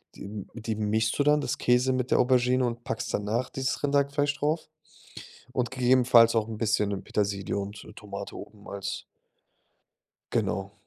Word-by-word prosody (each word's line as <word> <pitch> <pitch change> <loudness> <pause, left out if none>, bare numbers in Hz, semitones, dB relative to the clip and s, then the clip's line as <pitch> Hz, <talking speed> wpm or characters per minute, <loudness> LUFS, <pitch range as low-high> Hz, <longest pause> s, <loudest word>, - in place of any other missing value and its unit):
die - - -10
m 100 -1 -7
die 110 -1 -3
mischst 110 +1 0
du - - +5
dann, 150 +1 +4
das - - -2
Käse 125 +2 +3
mit 130 0 -2
der - - +4
Aubergine 125 0 +3
und 120 0 -3
packst 115 - -4
danach 110 +5 -1
dieses 135 +1 -2
Rinderhackfleisch 145 0 +1
drauf 155 +3 -1 0.8
und 125 -2 -1
gegebenenfalls 125 -2 +5
auch 110 -1 +1
'n 110 -1 -6
bisschen 105 -3 0
Petersilie 100 -1 -1
und, 100 +1 -6
äh, - - -12
Tomate 100 -1 -7
oben 105 -1 -11
als 100 +1 -4 1.3
Genau. 100 0 -1
115 Hz, 160 wpm, -27 LUFS, 105-130 Hz, 1.3 s, du